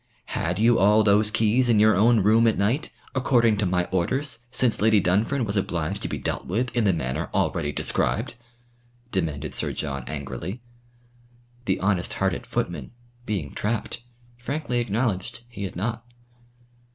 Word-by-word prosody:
"Had 85 +1 -1
you 115 +2 +4
all 105 +3 +5
those 105 +1 +4
keys 115 +4 +2
in 110 -3 +4
your 110 0 +5
own 110 +3 +4
room 110 +4 +4
at 110 - +2
night, 115 +10 0 0.2
according 120 -4 +3
to 100 -2 +1
my 90 0 +1
orders 115 +8 0
since 125 -4 +2
Lady 110 -1 +5
Dunfern 105 +8 +1
was 100 -1 -3
obliged 85 -5 -1
to - - -2
be - - -3
dealt - - -3
with 120 +6 -1
in 120 -3 +2
the 100 - +5
manner 65 -7 -2
already 75 - 0
described?" - - 0 0.8
demanded 75 -6 -2
Sir - - -1
John 70 -3 -3
angrily. 75 - -5 1.1
The 95 - 0
honest 95 -2 0
hearted - - -1
footman, 85 - -3 0.3
being 90 -10 -2
trapped, 110 +2 -2 0.4
frankly 135 -1 -2
acknowledged 115 -1 -2
he 105 -5 -6
had 95 - -7
not. 115 +5 -3
105 Hz, 155 wpm, -25 LUFS, 90-115 Hz, 1.1 s, all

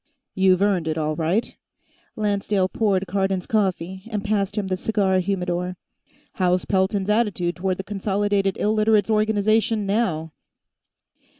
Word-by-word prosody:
"You've 190 0 +3
earned 190 -5 +1
it, 160 0 -1
all 155 -1 -1
right." 170 +8 -1 0.6
Lancedale 205 -2 0
poured 195 -2 0
Cardon's 190 -1 -1
coffee 190 -3 -1
and 210 -2 -3
passed 205 -1 0
him 205 - 0
the 190 -1 -1
cigar 190 -1 +1
humidor. 180 -1 -2 0.6
"How's 180 -2 +1
Pelton's 190 0 0
attitude 205 -6 0
toward 185 0 -1
the 195 - -5
Consolidated 200 -1 0
Illiterates' 215 0 +2
Organization, 215 0 +2
now?" 185 -7 -1
195 Hz, 125 wpm, -23 LUFS, 185-210 Hz, 0.6 s, You've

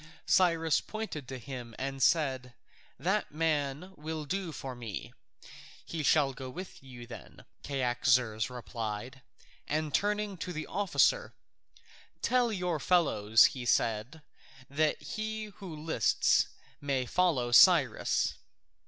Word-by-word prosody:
Cyrus 165 -4 +3
pointed 215 - -6
to 130 +1 -6
him 125 -3 -8
and 135 0 -4
said, 130 -7 +1 0.4
"That 190 - -1
man 155 +2 -1
will 155 0 -5
do 185 +2 -3
for 135 -3 -6
me." 115 -5 -7 0.7
"He 165 - -4
shall 145 -2 +3
go 130 0 -7
with 180 +8 -9
you 125 -3 -11
then," 120 0 -12 0.2
Cyaxares 125 -4 +1
replied. 120 +1 -6 0.5
And 155 0 -1
turning 210 -1 0
to 180 +1 -5
the 155 -1 -4
officer, 205 - +1 0.9
"Tell 250 -2 +2
your 180 -5 -1
fellows," 110 - +4
he 130 - -6
said, 120 +5 0 0.5
"that 155 +2 +1
he 215 -1 -5
who 180 -5 -8
lists 150 -7 +2 0.3
may 135 -3 -1
follow 135 -6 +1
Cyrus." 140 - +5
145 Hz, 120 wpm, -30 LUFS, 125-180 Hz, 0.9 s, Cyrus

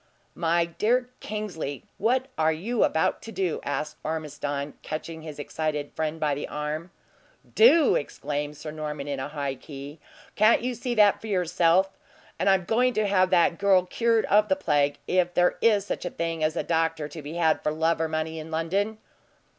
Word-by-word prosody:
"My 170 0 +1
dear 245 +9 0
Kingsley, 185 -10 -5 0.2
what 250 +5 +2
are 160 0 +2
you 210 +10 0
about 160 - +1
to 225 - -9
do?" 185 -6 -1
asked 150 +2 -3
Ormiston, 145 -2 -3
catching 160 +1 -6
his 155 -2 -8
excited 150 0 -3
friend 160 0 -2
by 150 -2 +1
the 145 - -4
arm. 150 +3 -4 0.6
"Do!" 335 - +6
exclaimed 145 0 -3
Sir 155 - -7
Norman, 150 -2 -5
in 140 -2 -3
a 130 - -3
high 145 -2 -3
key. 140 +2 -10 0.4
"Can't 215 +2 +4
you 250 0 -1
see 245 0 -3
that 210 -2 +5
for 225 - -7
yourself! 180 0 +2 0.4
And 195 - +2
I'm 190 -2 +3
going 245 +5 +2
to 215 - +2
have 185 -2 +3
that 170 -2 +3
girl 190 -2 +4
cured 230 +3 +1
of 210 +1 +3
the 190 - +4
plague, 145 -6 +1
if 180 -1 +1
there 180 0 +3
is 210 -3 +4
such - - -4
a 175 - -2
thing 165 -1 -3
as 155 +1 +1
a - - -1
doctor 165 -2 0
to 155 +2 -9
be 150 +3 -7
had 160 -2 +2
for 150 - 0
love 160 +1 +1
or 160 - +1
money 160 0 -3
in 155 +1 -8
London." 190 +7 -1
165 Hz, 185 wpm, -26 LUFS, 150-200 Hz, 0.6 s, Do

